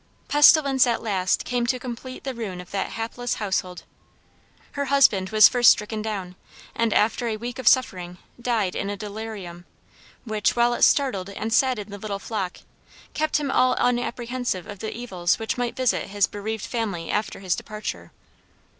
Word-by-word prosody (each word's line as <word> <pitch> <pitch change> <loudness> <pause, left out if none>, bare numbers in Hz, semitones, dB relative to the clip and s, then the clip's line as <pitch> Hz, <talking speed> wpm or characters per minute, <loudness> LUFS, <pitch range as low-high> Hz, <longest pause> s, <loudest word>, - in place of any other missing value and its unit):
Pestilence 285 -3 +6
at 235 -1 0
last 190 -4 0
came 245 -1 -1
to 255 - +1
complete 250 0 -8
the 265 - -3
ruin 210 -7 -5
of 180 - -11
that 195 -1 -3
hapless 230 +2 -3
household. 190 -3 -3 0.9
Her 285 0 -2
husband 260 -9 +4
was 215 +1 +8
first 245 -2 +5
stricken 215 +1 +1
down, 195 -4 -4 0.4
and 230 -1 0
after 225 +4 +2
a 220 -2 -2
week 245 +3 -6
of 255 - -4
suffering, 180 -9 +2 0.2
died 225 -7 0
in 200 - -2
a 205 - -4
delirium, 205 -4 -7 0.6
which, 215 -2 0
while 240 0 +3
it - - -4
startled 205 -10 +3
and 220 +3 -4
saddened 225 -6 +1
the 205 - -7
little 200 -1 -4
flock, 195 -3 -4 0.5
kept 310 0 +1
him 290 -2 -2
all 255 -1 +3
unapprehensive 245 -4 -1
of 205 -2 -9
the 220 - -4
evils 185 -8 -1
which 225 - -2
might 245 -1 -2
visit 255 -2 0
his 200 0 +2
bereaved 215 +1 -5
family 200 -9 -3
after 210 +1 -2
his 185 -3 0
departure. 215 0 -6
220 Hz, 170 wpm, -24 LUFS, 200-245 Hz, 0.9 s, was